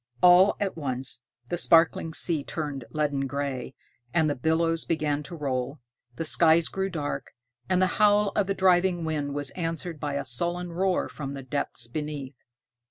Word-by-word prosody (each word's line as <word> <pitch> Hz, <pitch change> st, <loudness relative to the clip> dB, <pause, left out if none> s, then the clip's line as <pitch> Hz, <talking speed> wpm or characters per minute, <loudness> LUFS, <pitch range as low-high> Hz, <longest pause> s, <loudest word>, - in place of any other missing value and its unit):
All 180 Hz, +3 st, +7 dB
at 200 Hz, -2 st, -1 dB
once, 130 Hz, -4 st, -3 dB, 0.3 s
the 175 Hz, -, -2 dB
sparkling 165 Hz, -1 st, +4 dB
sea 160 Hz, -5 st, +1 dB
turned 145 Hz, -6 st, -4 dB
leaden 145 Hz, -3 st, -1 dB
gray, 135 Hz, -2 st, -4 dB, 0.4 s
and 160 Hz, -2 st, +4 dB
the 145 Hz, -, +1 dB
billows 165 Hz, +4 st, +1 dB
began 150 Hz, -3 st, -1 dB
to 150 Hz, +4 st, -9 dB
roll, 135 Hz, -2 st, -3 dB, 0.4 s
the 165 Hz, -, -3 dB
skies 160 Hz, +1 st, +5 dB
grew 190 Hz, 0 st, -2 dB
dark, 145 Hz, -6 st, -4 dB, 0.3 s
and 185 Hz, -, +3 dB
the 185 Hz, -, +4 dB, 0.2 s
howl 205 Hz, -1 st, +5 dB
of 205 Hz, -2 st, +1 dB
the 195 Hz, -, -1 dB
driving 180 Hz, -2 st, +3 dB
wind 145 Hz, -3 st, -2 dB
was 145 Hz, -2 st, -2 dB
answered 165 Hz, -1 st, -4 dB
by 145 Hz, -1 st, -3 dB
a 140 Hz, -, -2 dB
sullen 175 Hz, +7 st, -2 dB
roar 185 Hz, +1 st, +1 dB
from 140 Hz, -2 st, -6 dB
the 135 Hz, -, -7 dB
depths 130 Hz, -3 st, -2 dB
beneath. 145 Hz, +1 st, -5 dB
160 Hz, 165 wpm, -27 LUFS, 140-175 Hz, 0.4 s, All